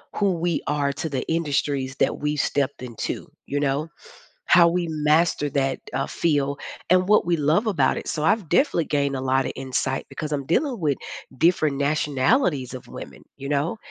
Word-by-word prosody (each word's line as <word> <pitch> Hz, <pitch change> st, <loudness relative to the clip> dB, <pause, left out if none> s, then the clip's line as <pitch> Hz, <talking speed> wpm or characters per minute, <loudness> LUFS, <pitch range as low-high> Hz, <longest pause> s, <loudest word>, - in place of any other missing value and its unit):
who 200 Hz, -2 st, +2 dB
we 170 Hz, -1 st, -1 dB
are 145 Hz, -1 st, +1 dB
to 145 Hz, +3 st, -4 dB
the 135 Hz, -4 st, -2 dB
industries 145 Hz, -4 st, -1 dB
that -, -, +2 dB
we 150 Hz, 0 st, -1 dB
stepped 140 Hz, -1 st, -1 dB
into, 120 Hz, -3 st, -5 dB
you 145 Hz, 0 st, -2 dB
know? 145 Hz, +2 st, 0 dB, 0.6 s
How 170 Hz, -1 st, +7 dB
we 175 Hz, 0 st, 0 dB
master 150 Hz, -1 st, +2 dB
that, 135 Hz, -1 st, 0 dB
uh, 135 Hz, -, -1 dB
field 145 Hz, -4 st, 0 dB, 0.3 s
and 185 Hz, +1 st, +3 dB
what 210 Hz, -3 st, +4 dB
we 170 Hz, -1 st, +2 dB
love 155 Hz, +9 st, +2 dB
about 165 Hz, -11 st, +2 dB
it, -, -, -6 dB
so 150 Hz, -, -2 dB
I've 200 Hz, 0 st, +2 dB
definitely 175 Hz, -, +2 dB
gained 140 Hz, -2 st, 0 dB
a -, -, -3 dB
lotta 130 Hz, 0 st, +1 dB
insight 130 Hz, 0 st, -2 dB
because 155 Hz, -2 st, -5 dB
I'm 140 Hz, -2 st, -2 dB
dealing 250 Hz, -, +1 dB
with 145 Hz, -4 st, +1 dB, 0.4 s
different 155 Hz, -2 st, +2 dB
nationalities 145 Hz, -, +1 dB
of 130 Hz, -, -8 dB
women, -, -, -10 dB
you 140 Hz, -, -7 dB
know? 145 Hz, +8 st, 0 dB
150 Hz, 175 wpm, -24 LUFS, 140-170 Hz, 0.6 s, How